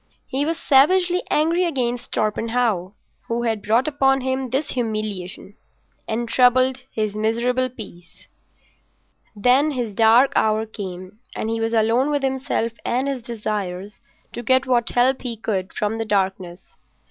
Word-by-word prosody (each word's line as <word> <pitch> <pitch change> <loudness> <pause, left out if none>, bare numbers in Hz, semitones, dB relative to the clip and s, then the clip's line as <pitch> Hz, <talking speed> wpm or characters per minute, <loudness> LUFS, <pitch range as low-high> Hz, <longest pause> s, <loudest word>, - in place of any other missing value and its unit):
He 275 +2 -2
was 330 0 -1
savagely 355 +6 +4
angry 330 +4 +2
against 250 -7 -2
Torpenhow, 215 -3 0 0.3
who 235 +1 -1
had 225 -3 -1
brought 230 +7 +2
upon 270 -2 +2
him 260 0 -2
this 270 +5 -1
humiliation 215 -5 -4 0.5
and 235 +2 -2
troubled 255 +2 +3
his 215 -2 -2
miserable 235 +4 0
peace. 185 -8 -13 1.1
Then 250 +8 +3
his 245 -7 -3
dark 230 +5 +5
hour 220 0 +2
came 190 -1 -8 0.2
and 220 - -3
he 225 0 -2
was 225 +1 0
alone 230 +5 +2
with 290 -2 -1
himself 265 -3 -1
and 255 +3 0
his 275 -3 -2
desires 210 -4 -4 0.3
to - - -5
get 260 +2 +3
what 245 -3 +1
help 255 +2 +2
he 235 -3 -5
could 195 -4 -3
from 215 +2 -2
the 225 - -2
darkness. 190 -3 -2
235 Hz, 145 wpm, -22 LUFS, 215-260 Hz, 1.1 s, dark